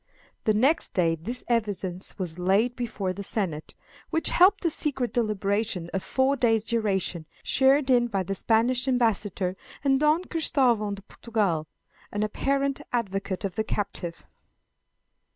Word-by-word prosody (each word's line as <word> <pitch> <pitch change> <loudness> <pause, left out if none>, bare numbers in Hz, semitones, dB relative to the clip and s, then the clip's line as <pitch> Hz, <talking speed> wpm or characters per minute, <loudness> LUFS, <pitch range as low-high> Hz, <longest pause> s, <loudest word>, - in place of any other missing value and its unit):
The 215 - +4
next 275 +10 +2
day 170 -3 +3
this 220 +11 -5
evidence 200 -6 -1
was 180 -3 -4
laid 200 +7 +2
before 220 -6 -3
the 200 - -6
senate, 180 -7 -3 0.3
which 325 - +1
held 370 +3 +6
a 335 - +3
secret 270 -6 -1
deliberation 205 -5 -1
of 195 - -1
four 265 +6 +1
days' 225 -5 +2
duration, 195 -8 -1 0.2
shared 270 +1 +3
in 240 -1 +4
by 195 -5 -1
the 195 - -3
Spanish 240 +5 +1
ambassador 210 -7 +1 0.3
and 270 -1 +3
Don 305 +4 +3
Christavao 250 - +1
de 200 - -12
Portugal, 200 -8 -1 0.4
an 205 +1 -1
apparent 275 +5 0
advocate 195 -5 -2
of 190 - -3
the 220 - -1
captive. 195 -5 -4
220 Hz, 140 wpm, -26 LUFS, 195-255 Hz, 0.4 s, held